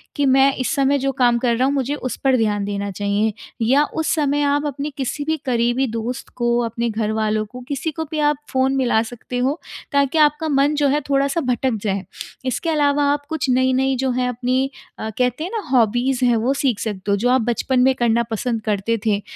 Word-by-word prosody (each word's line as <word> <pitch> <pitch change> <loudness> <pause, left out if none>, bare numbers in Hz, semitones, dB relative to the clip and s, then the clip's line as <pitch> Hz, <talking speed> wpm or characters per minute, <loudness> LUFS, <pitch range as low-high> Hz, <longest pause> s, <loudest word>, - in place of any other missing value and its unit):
कि 290 - +1
मैं 270 +1 +5
इस 255 - -1
समय 275 0 +2
जो 275 +1 0
काम 245 -3 +2
कर 235 -1 +1
रहा 255 +3 +2
हूँ 275 - +1
मुझे 280 +1 -1
उस 255 -3 -4
पर 265 -2 +4
ध्यान 210 -3 0
देना 200 0 -3
चाहिए। 205 +2 0 0.3
या 265 +6 +4
उस 320 -1 0
समय 290 -2 +1
आप 290 +1 +1
अपने 285 +1 -3
किसी 275 +2 -3
भी 315 +1 0
करीबी 240 +1 +1
दोस्त 230 +4 -4
को, 240 -1 +1
अपने 235 +1 -2
घरवालों 215 0 -1
को 250 +4 -11
किसी 285 +3 -2
को 320 +1 -4
भी 310 - -2
आप 295 -1 +2
फ़ोन 265 +1 +1
मिला 245 -4 +2
सकते 245 +2 -7
हो। 270 +6 0 0.3
ताकि 280 +2 +2
आपका 300 +1 +3
मन 285 +1 +2
जो 290 -1 +2
है 290 +2 +1
थोड़ा-सा 275 +3 +1
भटक 255 -1 0
जाए। 195 -2 -1 0.4
इसके 255 +6 -1
अलावा 290 -2 +2
आप 290 0 -4
कुछ 315 -4 -2
नई-नई 260 +1 +2
जो 260 0 0
हैं 250 0 0
अपनी 250 +1 -1 0.4
अ, 220 - -3
कहते 250 +4 0
हैं 355 - -5
ना 450 -2 -2
हॉबीज़ 245 +2 +2
हैं 240 -1 +4
वो 245 +5 +1
सीख 255 -7 +1
सकते 200 -2 -3
हो, - - +4
जो 240 +5 +1
आप 255 0 +4
बचपन 240 +3 0
में 265 +1 +4
करना 235 -1 +2
पसंद 225 +1 -2
करते 215 +1 -1
थे। 205 -2 +1
255 Hz, 215 wpm, -20 LUFS, 230-280 Hz, 0.4 s, मैं